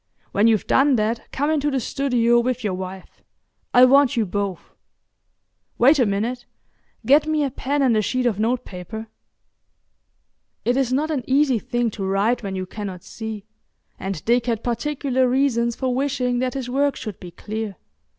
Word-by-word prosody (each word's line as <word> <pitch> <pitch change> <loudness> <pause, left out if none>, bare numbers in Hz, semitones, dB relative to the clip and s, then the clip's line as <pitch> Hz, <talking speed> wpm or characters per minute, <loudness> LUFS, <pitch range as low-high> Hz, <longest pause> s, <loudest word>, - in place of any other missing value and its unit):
When 205 +3 +3
you've 220 -3 +2
done 275 0 +4
that 225 +1 -2
come 290 +3 0
into 295 -2 +1
the 270 -2 0
studio 240 -2 +2
with 250 +1 -1
your 205 -3 -1
wife. 185 0 -8 0.5
I 250 +1 +7
want 275 0 +4
you 225 - +2
both. 200 -1 -4 1.0
Wait 275 +5 +5
a 245 - +4
minute; 225 +5 -2 0.6
get 290 +3 +5
me 310 -1 +1
a 275 - -1
pen 280 +3 -1
and 250 -4 +3
a 215 - +3
sheet 255 +4 -1
of 220 -4 +1
notepaper." 220 -2 -3 1.6
It 245 - +2
is 265 -2 +1
not 300 +5 0
an 275 -5 -1
easy 270 -3 +3
thing 240 +1 -1
to 200 - -6
write 200 +5 +1
when 195 -3 -4
you 185 0 -3
cannot 190 -2 -7
see, 220 -1 -7 0.5
and 190 -5 -5
Dick 240 +1 +2
had 230 -2 -1
particular 260 0 0
reasons 240 -3 +1
for 260 -2 -1
wishing 250 -2 0
that 255 +1 -1
his 265 -3 -3
work 280 +3 +1
should 215 -4 -7
be 180 - -9
clear. 215 +3 -5
240 Hz, 170 wpm, -22 LUFS, 215-265 Hz, 1.6 s, I